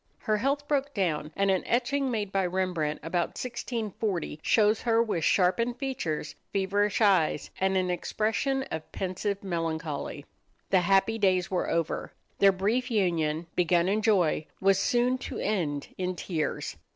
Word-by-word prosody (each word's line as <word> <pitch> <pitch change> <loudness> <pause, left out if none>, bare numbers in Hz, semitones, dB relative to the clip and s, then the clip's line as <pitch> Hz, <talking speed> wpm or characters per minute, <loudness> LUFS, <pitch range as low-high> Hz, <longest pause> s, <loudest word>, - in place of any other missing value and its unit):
Her 215 -2 0
health 280 +5 -1
broke 285 -1 0
down, 155 -6 -1
and 195 0 +2
an 190 - +2
etching 260 +3 +1
made 210 -5 -2
by 195 -2 +1
Rembrandt 175 -5 -1
about 170 +2 -1
1640 220 -9 -3
shows 215 0 +3
her 230 -1 +2
with 190 -8 -2
sharpened 210 +9 +2
features, 170 - -3 0.2
feverish 200 +2 +1
eyes, 185 -8 +3
and 190 0 +2
an 185 -1 +1
expression 225 +9 -1
of 160 -1 -5
pensive 195 +2 -3
melancholy. 160 -5 -3 0.5
The 190 - +6
happy 195 +5 +2
days 185 -2 +2
were 185 - 0
over. 165 -1 -1 0.3
Their 200 0 +7
brief 215 +7 0
union, 170 -7 0
begun 175 0 +3
in 210 +3 +1
joy, 185 -8 +2
was 195 0 +3
soon 250 +3 +2
to - - -6
end 155 -9 -1
in 185 0 -1
tears. 150 - -3
195 Hz, 150 wpm, -28 LUFS, 170-225 Hz, 0.5 s, Their